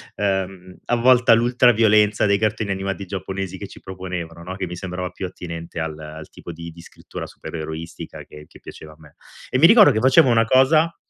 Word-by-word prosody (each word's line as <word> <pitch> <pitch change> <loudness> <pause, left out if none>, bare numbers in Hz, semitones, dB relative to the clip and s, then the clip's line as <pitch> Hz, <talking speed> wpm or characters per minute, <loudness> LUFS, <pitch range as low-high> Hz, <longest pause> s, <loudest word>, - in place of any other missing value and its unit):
ehm, 95 -2 -3
a 120 - +1
volte 125 0 +3
a - - +9
l'ultra 120 +1 +3
violenza 105 -1 +3
dei 100 -1 +2
cartoni 110 -1 -1
animati 95 0 -4
giapponesi 95 0 -5
che 100 - -7
ci - - -14
proponevano, 90 -3 -7
no? 95 +2 -7
Che 95 - -4
mi 90 0 -7
sembrava 90 0 -5
più 95 - -6
attinente 85 -2 -8
al 80 -1 -4
al 75 0 -10
tipo - - -11
di 85 0 -9
di 85 +1 -14
scrittura - - -10
supereroistica 80 +1 -8
che 75 0 -14
che - - -17
piaceva 75 0 -12
a - - -20
me. 75 -2 -19 0.4
E 130 - +1
mi 165 - +8
ricordo 220 -1 +7
che 110 - 0
facevo 130 +1 +5
una 115 -1 +3
cosa 155 +7 +3
95 Hz, 205 wpm, -21 LUFS, 85-115 Hz, 0.4 s, a